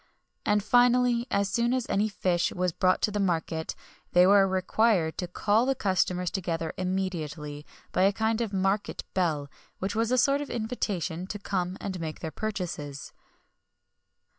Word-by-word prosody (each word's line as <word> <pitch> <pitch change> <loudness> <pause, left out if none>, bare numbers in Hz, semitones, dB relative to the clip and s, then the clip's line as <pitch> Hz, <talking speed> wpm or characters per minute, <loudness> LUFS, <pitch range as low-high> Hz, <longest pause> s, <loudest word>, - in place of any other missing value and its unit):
[XXI - - -42
13] - - +2
And 210 -1 +2
finally, 245 +1 +4
as 200 0 +1
soon 235 +5 +1
as 255 -2 -1
any 205 +2 +1
kind - - -1
of 205 - -19
fish 175 -1 +1
was 180 0 0
brought 185 +3 +1
to 210 -1 +1
market, 165 -4 -1 0.4
they 180 +1 +7
were 195 0 +6
required 185 -2 +2
to 180 - -2
call 210 +6 +1
the 270 - +2
customers 185 -5 0
together 165 -4 -2
immediately, 165 -6 -3 0.2
by - - +1
a 195 +1 +5
kind 220 +2 0
of 225 -3 -2
market 195 +1 -1
bell, 160 -6 0 0.3
which 190 +2 -3
was 225 +1 0
a 255 - +3
sort 275 +3 +3
of 290 - -5
invitation 200 -7 -3
to 205 - -4
come 185 -2 -2
and 190 -2 -4
make 160 -2 -5
their 160 - -5
purchases. 175 -10 -5
190 Hz, 175 wpm, -28 LUFS, 175-220 Hz, 0.4 s, they